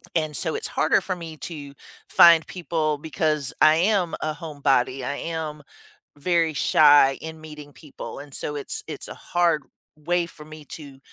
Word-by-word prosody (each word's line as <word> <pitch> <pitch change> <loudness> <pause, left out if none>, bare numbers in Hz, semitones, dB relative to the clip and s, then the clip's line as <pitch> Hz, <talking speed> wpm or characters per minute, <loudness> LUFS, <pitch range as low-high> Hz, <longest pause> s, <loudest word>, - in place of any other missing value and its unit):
and 155 -2 -1
so - - -1
it's 445 - -4
harder - - +2
for 185 - -3
me 165 -3 -9
to 145 -4 -8 0.4
find 170 -2 +7
people 160 -4 -2
because 155 -2 -2
I 155 0 +7
am 180 0 +1
a 155 0 -1
homebody, 140 -5 0
I 140 +3 -3
am 160 -2 -5 0.6
very 165 +1 +1
shy 145 -2 +5
in 160 0 -8
meeting 150 -2 -11
people, 150 -1 -10
and 145 0 -11
so 150 - -4
it's 140 - -3
it's - - -7
a - - -7
hard 170 -4 0 0.3
way 170 +3 -1
for 155 -2 -13
me 155 -1 -12
to 140 -3 -10
155 Hz, 165 wpm, -24 LUFS, 145-165 Hz, 0.6 s, find